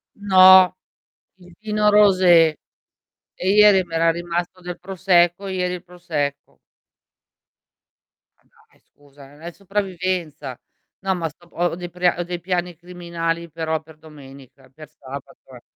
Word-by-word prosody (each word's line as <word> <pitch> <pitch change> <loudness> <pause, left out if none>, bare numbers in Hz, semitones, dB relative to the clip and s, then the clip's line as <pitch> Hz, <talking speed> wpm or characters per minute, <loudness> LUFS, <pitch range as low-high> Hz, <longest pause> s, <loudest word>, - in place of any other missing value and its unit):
No, 185 -2 +6 0.6
il 180 -1 -18
Pinot 210 -1 0
Rosé. 185 -6 +5 0.8
E 185 - -3
ieri 205 -1 +5
mi 170 -2 -9
era 165 0 +3
rimasto 175 +2 -5
del 180 0 -8
prosecco 180 0 +1
ieri 180 -1 -2
il 180 - -11
prosecco. 165 -6 -5 1.8
Dai - - -30
scusa, 145 -1 -19
non 145 +2 -19
è 170 +1 -7
sopravvivenza. 185 - -4 0.5
No 190 -1 0
ma 170 -2 -3
sto 175 +4 -22
po - - -27
ho 175 -1 -1
dei 175 0 -8
pra 180 0 0
ho - - -1
dei 175 0 -6
piani 175 0 -3
criminali 170 -1 -5
però 160 0 -3
per 160 0 -18
domenica, 135 -4 -16
per 155 +3 -14
sabato 140 -2 -12
eh. 120 - -14
175 Hz, 135 wpm, -21 LUFS, 160-185 Hz, 1.8 s, No